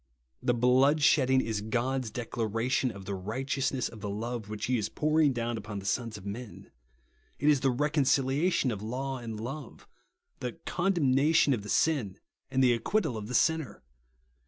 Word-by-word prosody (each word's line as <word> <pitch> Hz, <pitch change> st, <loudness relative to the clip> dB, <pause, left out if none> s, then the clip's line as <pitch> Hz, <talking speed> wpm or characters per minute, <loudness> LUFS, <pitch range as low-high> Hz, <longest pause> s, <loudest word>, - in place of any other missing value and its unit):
The 120 Hz, -, +1 dB
bloodshedding 130 Hz, +2 st, +4 dB
is 110 Hz, -4 st, -2 dB
God's 125 Hz, +3 st, -1 dB
declaration 115 Hz, +3 st, -1 dB
of 100 Hz, -4 st, -9 dB
the 100 Hz, -, -3 dB
righteousness 130 Hz, +7 st, -2 dB
of 110 Hz, -2 st, -11 dB
the 105 Hz, -, -4 dB
love 110 Hz, +1 st, -4 dB
which 105 Hz, -1 st, -4 dB
he 125 Hz, -1 st, +1 dB
is 105 Hz, 0 st, -2 dB
pouring 155 Hz, +2 st, +2 dB
down 120 Hz, -2 st, -2 dB
upon 105 Hz, -1 st, -7 dB
the 95 Hz, -, -7 dB
sons 115 Hz, +1 st, -1 dB
of 100 Hz, -, -12 dB
men; 105 Hz, +3 st, -8 dB, 0.7 s
it 145 Hz, -, -1 dB
is 150 Hz, -2 st, +5 dB
the 135 Hz, -, +2 dB
reconciliation 140 Hz, +2 st, +2 dB
of 105 Hz, -3 st, -5 dB
law 130 Hz, +4 st, -3 dB
and 115 Hz, -3 st, -6 dB
love; 135 Hz, +3 st, -7 dB, 0.5 s
the 125 Hz, -2 st, -4 dB
condemnation 155 Hz, -5 st, +3 dB
of 115 Hz, -, -2 dB
the 105 Hz, -, -9 dB
sin 130 Hz, -12 st, +1 dB, 0.3 s
and 130 Hz, 0 st, +2 dB
the 125 Hz, -1 st, +5 dB
acquittal 145 Hz, -, 0 dB
of 105 Hz, -1 st, -5 dB
the 125 Hz, -, -3 dB
sinner. 155 Hz, -, +1 dB
125 Hz, 165 wpm, -29 LUFS, 110-135 Hz, 0.7 s, is